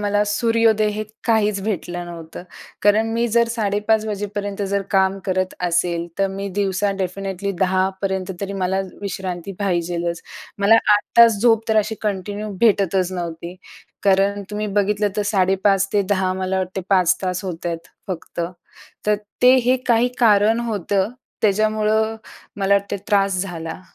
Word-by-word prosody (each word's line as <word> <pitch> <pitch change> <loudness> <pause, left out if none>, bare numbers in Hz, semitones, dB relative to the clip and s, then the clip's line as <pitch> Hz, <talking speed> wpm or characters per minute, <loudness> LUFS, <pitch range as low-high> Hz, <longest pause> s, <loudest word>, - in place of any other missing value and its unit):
मला 205 0 +1
सूर्योदय 225 0 +2
हे 215 +1 -3 0.2
काहीच 210 -3 +2
भेटलं 175 -4 -3
नव्हतं. 165 0 -9 0.4
कारण 210 +2 +4
मी 235 +1 +1
जर 235 +1 +3
5:30 215 -1 0
वाजेपर्यंत 205 -1 -4
जर 200 0 +1
काम 190 -1 +2
करत 185 0 -1
असेल, 170 0 0
तर 195 - +3
मी 195 +1 -5
दिवसा 200 0 +1
डेफिनेटली 195 +1 -3
10:00 190 0 +2
पर्यंत 190 -1 -2
तरी 200 0 -3
मला 190 0 0 0.2
विश्रांती 190 -1 -4
पाहिजेच. 175 -3 -1 0.4
मला 200 +3 +5 0.2
8 205 - +1 0.2
तास 230 -3 +7
झोप 225 -1 +3
तर 220 - +2
अशी 215 +1 +1
कंटिन्यू 205 +1 -3
भेटतच 195 -4 +2
नव्हती. 170 0 -5 0.5
कारण 200 +1 +3
तुम्ही 210 0 -3
बघितलं 205 +1 +1
तर 210 - +1
5:30 195 0 +2
ते 205 - +4
10:00 190 -2 +1
मला 190 0 -1
वाटते 185 +1 -3
5 185 -2 +4
तास 185 +1 -2
होत 175 -2 -5
आहेत, 165 -1 -2 0.3
फक्त. 175 -1 -5 0.7
तर 210 0 +3 0.3
ते 250 +1 +8
हे 255 +1 +4
काही 240 0 +3
कारण 220 0 +4
होतं 205 -3 -1 0.3
त्याच्यामुळं 215 +1 +2 0.4
मला 200 0 +2
वाटते 200 0 0
त्रास 195 -2 +2
झाला. 165 -2 -6
200 Hz, 150 wpm, -21 LUFS, 185-210 Hz, 0.7 s, ते